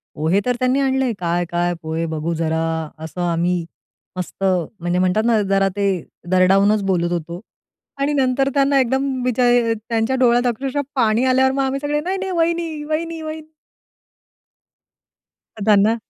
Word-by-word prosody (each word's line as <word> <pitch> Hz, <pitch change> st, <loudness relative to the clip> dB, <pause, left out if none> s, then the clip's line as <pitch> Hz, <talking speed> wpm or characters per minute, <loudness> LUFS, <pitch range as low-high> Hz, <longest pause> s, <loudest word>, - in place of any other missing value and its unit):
पोहे 160 Hz, +6 st, +1 dB
तर 250 Hz, -1 st, +1 dB
त्यांनी 255 Hz, +2 st, +1 dB
आणले. 265 Hz, -2 st, +1 dB
"काय 175 Hz, 0 st, 0 dB
काय 175 Hz, 0 st, 0 dB
पोहे 160 Hz, +1 st, -2 dB
बघू 160 Hz, +1 st, -3 dB
जरा." 160 Hz, 0 st, -1 dB, 0.4 s
असं 160 Hz, +3 st, -7 dB
आम्ही 170 Hz, +1 st, 0 dB, 0.5 s
मस्त 185 Hz, +2 st, -5 dB
म्हणजे 180 Hz, -1 st, -1 dB
म्हणतात 185 Hz, +4 st, +2 dB
ना 230 Hz, -2 st, +3 dB
जरा 195 Hz, 0 st, +3 dB
ते 200 Hz, 0 st, +1 dB, 0.4 s
दरडावूनच 195 Hz, +3 st, +4 dB
बोलत 175 Hz, -2 st, 0 dB
होतो 170 Hz, 0 st, -4 dB, 0.6 s
आणि 280 Hz, +2 st, +1 dB
नंतर 270 Hz, -1 st, +1 dB
त्यांना 275 Hz, 0 st, +3 dB
एकदम 265 Hz, +2 st, +1 dB
बीचा 250 Hz, 0 st, +1 dB, 0.5 s
त्यांच्या 230 Hz, +2 st, 0 dB
डोळ्यात 245 Hz, -1 st, +3 dB
अक्षरशः 265 Hz, +4 st, -1 dB
पाणी 230 Hz, -2 st, +2 dB
आल्यावर 260 Hz, 0 st, +3 dB
मग 275 Hz, +1 st, 0 dB
आम्ही 270 Hz, +1 st, -1 dB
सगळे 295 Hz, 0 st, -1 dB
"नाही, 370 Hz, +4 st, -2 dB
नाही 385 Hz, 0 st, -4 dB
वहिनी, 335 Hz, -2 st, -1 dB
वहिनी, 325 Hz, +2 st, -3 dB
वहिनी." 310 Hz, 0 st, -7 dB, 2.2 s
त्यांना 210 Hz, +1 st, +4 dB
230 Hz, 145 wpm, -20 LUFS, 180-275 Hz, 2.2 s, दरडावूनच